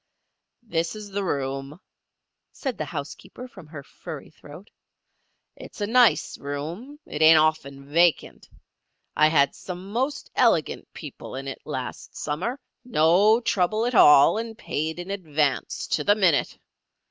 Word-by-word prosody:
"This 170 Hz, -5 st, -2 dB
is 210 Hz, -1 st, -9 dB
the 200 Hz, +1 st, -2 dB
room," 135 Hz, -1 st, -3 dB, 0.7 s
said 265 Hz, -4 st, -4 dB
the -, -, -4 dB
housekeeper, 160 Hz, -, -8 dB
from 190 Hz, -10 st, -14 dB
her 150 Hz, -2 st, -9 dB
furry -, -, -10 dB
throat. -, -, -14 dB, 0.8 s
"It's -, -, -12 dB
a 205 Hz, -, 0 dB
nice 240 Hz, +1 st, +3 dB
room. 165 Hz, -, -6 dB
It 150 Hz, -, -6 dB
ain't 160 Hz, 0 st, +8 dB
often 145 Hz, -3 st, 0 dB
vacant. 170 Hz, +3 st, +1 dB, 0.7 s
I 155 Hz, -, +5 dB
had 145 Hz, -3 st, +3 dB
some 185 Hz, +2 st, -9 dB
most 260 Hz, +6 st, -2 dB
elegant -, -, +1 dB
people -, -, -9 dB
in 135 Hz, +1 st, -6 dB
it 135 Hz, -, -7 dB
last 130 Hz, -4 st, -6 dB
summer—no 205 Hz, -, +1 dB
trouble 215 Hz, 0 st, 0 dB
at 245 Hz, -, -1 dB
all, 150 Hz, 0 st, +6 dB
and 225 Hz, -1 st, -6 dB
paid 160 Hz, +2 st, -3 dB
in 175 Hz, +2 st, -6 dB
advance 155 Hz, -7 st, -1 dB
to -, -, 0 dB
the 205 Hz, -, +4 dB
minute. 185 Hz, -8 st, +1 dB
170 Hz, 135 wpm, -24 LUFS, 150-215 Hz, 0.8 s, ain't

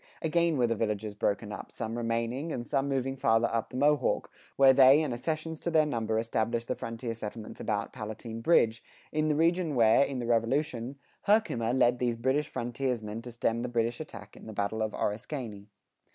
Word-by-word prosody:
Again 170 Hz, -1 st, +2 dB
were 125 Hz, -, +3 dB
the 115 Hz, 0 st, 0 dB
villages 105 Hz, -1 st, -2 dB
broken 105 Hz, +1 st, -1 dB
up, -, -, -7 dB
some 115 Hz, 0 st, -4 dB
remaining 120 Hz, +6 st, -2 dB
and 120 Hz, -4 st, -4 dB
some 135 Hz, +1 st, 0 dB
moving 135 Hz, -1 st, -1 dB
farther 115 Hz, -2 st, +3 dB
up 115 Hz, -1 st, -1 dB
the 125 Hz, -, -6 dB
Mohawk, 145 Hz, -1 st, +2 dB, 0.2 s
where 135 Hz, -1 st, +7 dB
they 135 Hz, +3 st, +7 dB
and 140 Hz, -5 st, -2 dB
accessions 155 Hz, +5 st, -3 dB
to -, -, -2 dB
their 160 Hz, -2 st, +4 dB
number 115 Hz, -6 st, -1 dB
established 115 Hz, +1 st, -1 dB
the -, -, 0 dB
frontier 115 Hz, +1 st, -5 dB
settlements 110 Hz, 0 st, -7 dB
about 105 Hz, -2 st, -2 dB
Palatine 110 Hz, 0 st, -6 dB
Bridge, 115 Hz, -6 st, +3 dB, 0.3 s
in 155 Hz, 0 st, +1 dB
the 150 Hz, -, +2 dB
region 165 Hz, 0 st, +2 dB
where, 115 Hz, +1 st, +5 dB
in 140 Hz, -1 st, 0 dB
the 120 Hz, -, -3 dB
Revolution, 120 Hz, +2 st, 0 dB, 0.3 s
Herkimer 200 Hz, -, +2 dB
led 125 Hz, -1 st, +3 dB
these 120 Hz, -2 st, 0 dB
German 130 Hz, +5 st, +1 dB
frontiersmen 120 Hz, -5 st, -3 dB
to 120 Hz, +1 st, -8 dB
stem 115 Hz, 0 st, -1 dB
the 125 Hz, -, -3 dB
British 120 Hz, 0 st, 0 dB
attack 105 Hz, -9 st, -9 dB
in -, -, -13 dB
the 110 Hz, -, -7 dB
battle 100 Hz, +2 st, -2 dB
of 110 Hz, -1 st, -1 dB
Oriskany. 105 Hz, -2 st, -4 dB
120 Hz, 190 wpm, -29 LUFS, 115-140 Hz, 0.3 s, where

